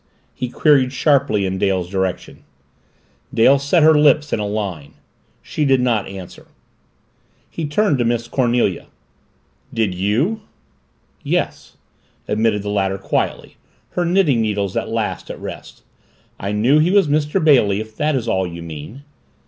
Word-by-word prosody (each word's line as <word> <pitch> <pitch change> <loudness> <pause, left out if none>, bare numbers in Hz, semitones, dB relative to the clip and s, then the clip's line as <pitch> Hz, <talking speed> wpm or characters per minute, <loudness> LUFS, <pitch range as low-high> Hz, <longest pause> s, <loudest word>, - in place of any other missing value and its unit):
he 125 - -4
queried 135 -1 +3
sharply 135 -7 +2
in 95 0 -2
Dale's 95 -3 0
direction. 95 -1 -3 0.9
Dale 135 +5 +4
set 145 +4 +2
her 160 +1 +7
lips 150 0 +3
in - - 0
a 105 - -2
line. 95 -9 -5 0.5
She 150 - -3
did 135 -2 +3
not 120 -5 0
answer. 95 -2 -10 1.0
He 160 -2 -4
turned 150 -2 +1
to - - +2
Miss 120 0 -1
Cornelia. 120 -7 0 0.8
"Did 110 -5 0
you?" 115 - 0 0.8
"Yes," - - -3 0.5
admitted 105 -1 0
the 105 - -4
latter 95 -1 0
quietly, - - -3 0.3
her 180 - -1
knitting 170 -9 +2
needles 100 -3 -2
at - - -2
last - - -3
at - - -7
rest. - - -9 0.6
"I 100 - -3
knew 120 +8 +3
he 160 +3 +3
was 195 -3 +4
Mr. 150 0 +1
Bailey 120 -10 +4
if 110 0 -8
that 150 0 0
is 120 -3 -2
all 95 -4 0
you 85 -1 -8
mean." 85 - -9
115 Hz, 150 wpm, -19 LUFS, 100-145 Hz, 1.0 s, her